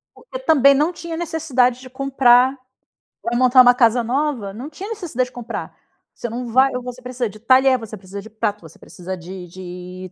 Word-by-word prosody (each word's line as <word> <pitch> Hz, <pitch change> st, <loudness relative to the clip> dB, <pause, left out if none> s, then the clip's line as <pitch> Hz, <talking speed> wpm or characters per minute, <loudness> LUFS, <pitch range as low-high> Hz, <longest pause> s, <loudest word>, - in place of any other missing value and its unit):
Porque -, -, -9 dB
também 280 Hz, -, +5 dB
não 300 Hz, +5 st, +1 dB
tinha 335 Hz, -1 st, -7 dB
necessidade 300 Hz, -7 st, 0 dB
de 255 Hz, 0 st, -12 dB
comprar 260 Hz, -1 st, +3 dB
hum, -, -, -17 dB, 0.7 s
vai 235 Hz, +1 st, -2 dB
montar 255 Hz, 0 st, +6 dB
uma 245 Hz, 0 st, +7 dB
casa 240 Hz, -1 st, +3 dB
nova? 250 Hz, -4 st, -2 dB
Não 250 Hz, +8 st, -7 dB
tinha 380 Hz, +7 st, -8 dB
necessidade 340 Hz, -, -2 dB
de -, -, -28 dB
comprar. 240 Hz, -1 st, -6 dB, 0.4 s
Você 240 Hz, -, -6 dB
não 240 Hz, +2 st, -5 dB
vai 260 Hz, +3 st, +3 dB
ou 250 Hz, -, -3 dB
você 250 Hz, 0 st, -8 dB
precisa 250 Hz, -1 st, -3 dB
de 215 Hz, -, -14 dB
talher, 260 Hz, +3 st, +4 dB
você 225 Hz, -3 st, -9 dB
precisa 190 Hz, +2 st, -9 dB
de 220 Hz, -, -12 dB
prato, 215 Hz, -2 st, -3 dB
você 160 Hz, -1 st, -15 dB
precisa 185 Hz, +1 st, -8 dB
de 180 Hz, +1 st, -9 dB
de 180 Hz, +1 st, -9 dB
250 Hz, 200 wpm, -20 LUFS, 215-270 Hz, 0.7 s, uma